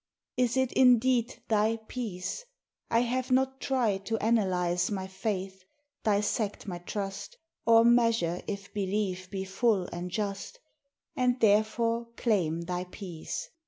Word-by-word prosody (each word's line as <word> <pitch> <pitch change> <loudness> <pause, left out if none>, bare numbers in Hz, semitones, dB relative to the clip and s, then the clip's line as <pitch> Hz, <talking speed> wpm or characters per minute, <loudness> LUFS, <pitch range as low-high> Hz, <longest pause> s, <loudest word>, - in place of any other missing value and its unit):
Is 250 0 +1
it 260 -1 +2
indeed 250 -1 +3
thy 220 +1 +2
peace? 220 - -4 0.4
I 230 0 +3
have 250 +2 -1
not 265 +1 +1
tried 230 -8 0
To 225 - 0
analyze 185 -6 +1
my 195 -3 -3
faith, 190 -1 -4 0.4
dissect 210 0 0
my 175 -2 -4
trust, 200 +2 -5 0.3
Or 230 0 +7
measure 230 -8 +3
if 200 -1 -6
belief 190 -2 -2
be 190 -1 -3
full 195 +1 +1
and 175 +1 -4
just, 200 - -4 0.6
And 250 0 +1
therefore 230 +2 +2
claim 170 -8 +1
thy 180 +1 -3
peace. 180 -3 -7
210 Hz, 125 wpm, -29 LUFS, 190-235 Hz, 0.6 s, Or